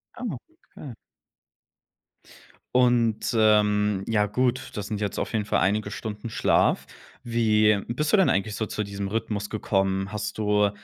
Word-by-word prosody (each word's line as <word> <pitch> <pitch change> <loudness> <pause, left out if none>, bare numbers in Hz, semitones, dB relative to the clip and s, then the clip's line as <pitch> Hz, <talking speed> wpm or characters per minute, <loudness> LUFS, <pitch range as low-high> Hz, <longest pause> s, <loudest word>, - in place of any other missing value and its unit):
Ah, 250 - -9 0.5
okay. 135 -5 -9 1.8
Und, 120 -3 +2
ähm, 105 -2 +3
ja, 105 -2 +2
gut, 125 +4 -1
das 105 -1 -4
sind 105 -2 -3
jetzt 100 -2 -2
auf - - -3
jeden 105 -2 0
Fall - - +1
einige 100 +1 0
Stunden 105 +1 -6
Schlaf. - - +2 0.4
Wie 110 -3 +3
bist 150 +6 -1
du - - +7
denn 190 - +4
eigentlich 105 +2 0
so 110 - -2
zu 105 0 -3
diesem 100 0 -5
Rhythmus 105 -1 -3
gekommen? 95 -2 -1
Hast 105 -1 -4
du 105 -1 +2
105 Hz, 150 wpm, -25 LUFS, 105-115 Hz, 1.8 s, du